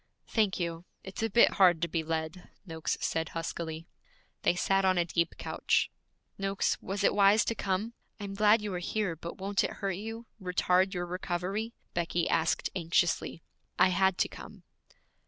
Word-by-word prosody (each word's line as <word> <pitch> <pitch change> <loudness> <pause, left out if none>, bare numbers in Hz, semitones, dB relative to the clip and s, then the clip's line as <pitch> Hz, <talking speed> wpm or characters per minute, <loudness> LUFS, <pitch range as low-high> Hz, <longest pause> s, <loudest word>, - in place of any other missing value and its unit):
'Thank 210 -5 +1
you. 170 0 -3 0.2
It's 190 +2 -7
a 225 - +1
bit 235 +3 +6
hard 175 -3 +6
to - - +2
be 165 0 -1
led,' 160 +2 -4 0.2
Noakes 160 -3 -3
said 160 -1 -1
huskily. 165 0 -4 0.5
They - - +2
sat 195 +2 +2
on 185 -1 +3
a 175 - +3
deep 170 0 -1
couch. - - 0 0.5
'Noakes, 195 0 0
was 195 +2 -3
it - - +4
wise 205 +1 +5
to - - 0
come? 205 +2 -2 0.3
I - - -6
am 200 -1 -5
glad 210 +2 +4
you 205 -2 -3
are 180 - -2
here, 190 -1 -1
but 170 +2 -8
won't 195 +1 0
it - - -2
hurt 195 -1 -2
you, 225 +3 -6 0.2
retard 185 +1 +2
your 175 0 -2
recovery?' 185 +5 -3 0.2
Becky 170 0 0
asked 160 0 +1
anxiously. 170 -1 0 0.3
'I 185 - +5
had 190 0 +2
to - - +2
come.' - - -12
185 Hz, 175 wpm, -30 LUFS, 170-200 Hz, 0.5 s, bit